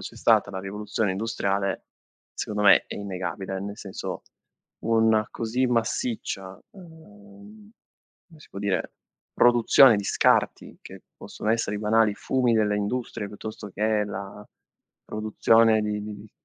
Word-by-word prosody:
c'è - - -9
stata - - +3
la 95 -1 -5
rivoluzione 105 +1 -3
industriale, 100 -1 -2 0.5
secondo 105 0 -3
me, 100 - +6
è - - -7
innegabile. 95 0 -5
Nel 100 +1 -6
senso, 95 -2 -7 0.6
una 110 -1 +2
così 125 +3 -1
massiccia, 115 -5 -2
ehm, 160 - -16 0.6
come 160 -3 -18
si - - -16
può 100 - -9
dire? 100 -1 -2 0.4
Produzione 120 0 +6
di 100 - -3
scarti, - - +1
che - - -12
possono 105 - -5
essere 110 -2 0
i - - -5
banali 110 0 +2
fumi 125 -3 0
delle 105 -2 +2
industrie, 105 0 -3
piuttosto 105 0 -8
che 105 +1 0
la 100 0 -8 0.6
produzione 110 +1 +3
di 105 0 -3
di-di 105 0 -9
105 Hz, 130 wpm, -25 LUFS, 100-115 Hz, 0.6 s, me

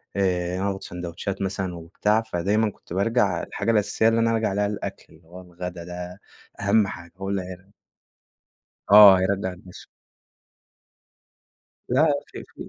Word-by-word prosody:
آآ، 90 -2 0
وناخد 95 0 -2
ساندويتشات 90 +3 -6
مثلًا 95 -2 -3
وبتاع، 105 +6 0
فدايمًا 105 +2 0
كنت - - -13
بارجع 100 -2 +1
الحاجة 110 +3 -2
الأساسية 105 +1 +2
اللي 115 0 +3
أنا 115 0 +2
أرجع 110 -2 0
ألاقيها 105 +1 0
الأكل - - -6
اللي 80 +1 -23
هو 90 +2 -11
الغدا 90 0 -8
ده 90 +2 -8 0.4
أهم 105 0 +3
حاجة 85 -1 -9
هو 95 0 -5
اللي 100 -1 -1
هير 90 0 -10 1.3
آه، 100 -2 +10
هيرجع 95 +1 0
النش 90 0 -13 2.0
لا 135 +6 +3 0.2
في - - -10
في - - -11
95 Hz, 140 wpm, -24 LUFS, 90-105 Hz, 2.0 s, آه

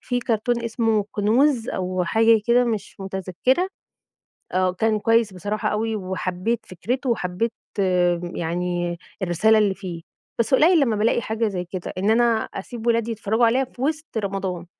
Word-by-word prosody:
في 245 -1 -1
كارتون 235 +1 0
اسمه 225 -2 +1
كنوز 235 +4 +2
أو 185 -1 -1
حاجة 225 +4 +4
كده 245 +1 +4
مش 220 -4 -3
متذكرة، 190 - 0 0.8
آه، 185 0 +2
وكان 215 +4 0
كويّس 225 -1 +2
بصراحة 205 +4 -2
أوي 220 +1 -1
وحبّيت 190 +3 -2
فكرته 250 +9 -3
وحبّيت 215 0 -1 0.8
يعني 175 +1 -2 0.2
الرسالة 190 +5 +3
اللي 210 -2 +3
فيه. 180 -4 -7 0.4
بس 230 +2 +1
قليل 325 +5 +6
لمّا 240 -7 +2
بالاقي 220 +3 +2
حاجة 220 +1 -1
زي 185 -3 -3
كده، 180 0 -6
إن 195 +3 +1
أنا 235 +2 +4 0.3
أسيب 230 +4 -6
ولادي 230 0 +2
يتفرجوا 220 +1 +1
عليها 245 +4 +3
في 250 0 -13
وسط 305 -3 -2
رمضان، 195 -4 -3
220 Hz, 150 wpm, -23 LUFS, 185-235 Hz, 0.8 s, قليل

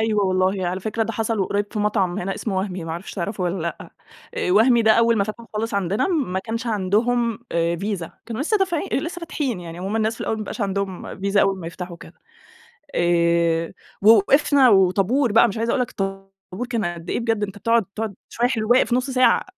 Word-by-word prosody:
أيوه 215 -2 +1
والله. 185 0 +1
على 185 +2 -2
فكرة، 220 +2 -1
ده 225 +1 -3
حصل 225 0 -1
وقريِّب 200 +2 0
في 215 - -3
مطعم 205 -3 0
هنا، 195 +2 -3
إسمه 200 -4 -3
وهمي، 185 -2 -3
ما 165 - -6
أعرفش 170 +4 -6
تعرفه 195 +1 -3
والّا 180 +2 -1
لأ. 170 - -5 0.4
آآ - - -1
وهمي 230 +4 +5
ده 220 0 +6
أوّل 230 0 +3
ما 200 - +2
فتح 215 +2 -7
خالص 220 0 -2
عندنا، 200 - 0
ما 275 - 0
كانش 225 +4 -4
عندهم 225 +3 +1
آآ 170 0 +1
فيزا، 195 -2 -4 0.2
كانوا 230 +3 -3
لسه 430 +7 +1
دافعين 355 -5 0
أ - - +2
لسه 335 +5 -3
فاتحين 275 - -3
يعني، 170 0 -8
هُم 195 +4 -2
الناس 220 0 0
في - - -15
الأوَّل - - -1
ما - - -7
بيبقاش 215 +2 -6
عندهم 195 -2 -3
فيزا 200 +1 +2
أول 195 -1 +2
ما 165 - -7
يفتحوا 175 +1 -7
وكده. 170 0 -14 0.8
آآ، 170 -1 +2 0.3
ووقفنا 255 +6 +5
وطابور 200 +6 +3
بقى، 230 - +6
مش 205 - -5
عايزة 230 +1 0
أقول 255 - +1
لك 245 - -3
طابور 195 +3 -6
كان 225 -5 -1
قد 175 0 -5
إيه، - - 0
بجد 225 -3 0
أنت 200 0 -5
بتقعد 230 0 +2
تقعد 220 -2 -3
شوية 240 +1 +1
حلو 225 -4 -2
واقف 245 -1 +4
نُص 255 +2 0
ساعة، 255 -1 +3
205 Hz, 215 wpm, -22 LUFS, 185-230 Hz, 0.8 s, ده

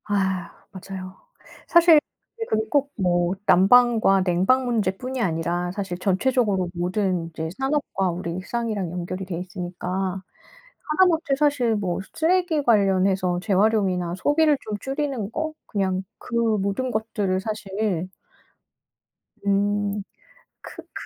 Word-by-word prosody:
아 190 -4 -1 0.2
맞아요. 190 0 -8 0.5
사실 340 -2 +7 0.4
그게 450 - -3
그리고 220 0 0
꼭 285 +1 +1
뭐 175 -1 +2
난방과 205 0 +5
냉방 190 +9 +2
문제뿐이 240 +3 -1
아니라 175 -1 -1
사실 190 -2 -4
전체적으로 195 -1 +1
모든 180 0 -1
이제 160 0 -5
산업과 270 -9 0
우리 170 -1 -4
일상이랑 205 -1 -3
연결이 180 +2 -4
되어 175 -2 -4
있으니까 185 +1 -4 0.7
하다못해 330 -3 +3
사실 280 -6 +2
뭐 190 -4 -2
쓰레기 335 -2 +1
관련해서 190 -5 +2
재활용이나 195 -4 +1
소비를 295 +6 +3
좀 210 -1 -4
줄이는 270 -6 -3
거 315 +4 -3
그냥 190 -3 -1 0.2
그 240 - -7 0.2
모든 200 +7 -1
것들을 210 -4 -1
사실 200 -3 -2 1.4
음. 205 +1 +1 0.6
크크 - - -11
200 Hz, 270 characters per minute, -24 LUFS, 185-245 Hz, 1.4 s, 사실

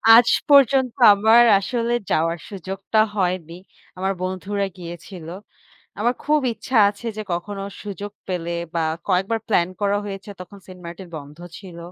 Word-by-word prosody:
আজ 235 +1 +6 0.2
পর্যন্ত 270 -3 +5 0.2
আমার 220 +4 +6 0.2
আসলে 235 +3 -2 0.2
যাওয়ার 165 +2 +1
সুযোগটা 195 +2 -3 0.2
হয়নি। 180 -3 -2 0.4
আমার 190 +1 -1
বন্ধুরা 195 +2 -2
গিয়েছিল। 170 0 -9 0.7
আমার 240 +3 +2
খুব 300 0 +3
ইচ্ছা 255 +3 -4
আছে 205 +3 -11
যে 215 - -3
কখনো 195 +3 -4 0.2
সুযোগ 205 0 -6 0.2
পেলে 170 -2 -3 0.2
বা 165 - +1 0.2
কয়েকবার 195 +5 +1
প্লান 175 -5 +2
করা 205 0 +1
হয়েছে 200 0 -7
তখন 200 +2 -10
সেন্টমার্টিন 180 0 -10
বন্ধ 145 0 -10 0.2
ছিল। 180 -4 -11
195 Hz, 135 wpm, -22 LUFS, 175-215 Hz, 0.7 s, আজ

